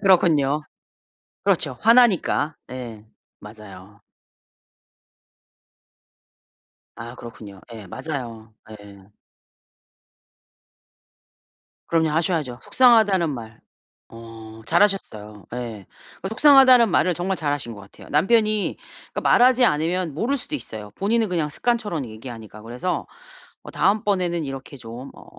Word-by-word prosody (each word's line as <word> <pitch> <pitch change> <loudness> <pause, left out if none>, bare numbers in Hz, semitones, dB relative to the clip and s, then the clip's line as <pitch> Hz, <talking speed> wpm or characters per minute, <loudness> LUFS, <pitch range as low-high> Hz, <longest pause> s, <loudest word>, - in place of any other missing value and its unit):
그렇군요. 155 -7 +3 0.8
그렇죠. 160 -9 0
화나니까. 215 -10 +3 0.2
예. 115 -4 -8 0.3
맞아요. 105 -1 -13 3.0
아 120 +1 -8
그렇군요. 110 -5 -11
예. 110 -3 -10
맞아요. 115 - -7 0.3
예. 100 -1 -15 2.8
그럼요. 160 -1 +1
하셔야죠. 155 -6 -1
속상하다는 220 -9 +4
말 115 -4 -8 0.5
어 115 -1 -12
잘하셨어요. 110 - 0
예. 115 -5 -6 0.4
그 190 - -3
속상하다는 260 -1 +6
말을 180 -1 +2
정말 180 +3 -2
잘 145 -4 -1
하신 130 -5 -4
것 100 - -11
같아요. 95 - -15
남편이 215 +6 +1 0.3
그러니까 - - -3
말하지 250 0 +5
않으면 165 0 -1
모를 245 - -1
수도 300 - -7
있어요. 110 - -7
본인은 220 +2 0
그냥 165 -5 -1
습관처럼 205 - -2
얘기하니까. 110 -1 -10
그래서 125 +11 -4 0.6
어 - - -10
다음번에는 190 -5 0
이렇게 135 0 -8
좀 120 +3 -9
어 - - -15
150 Hz, 260 characters per minute, -22 LUFS, -, 3.0 s, 속상하다는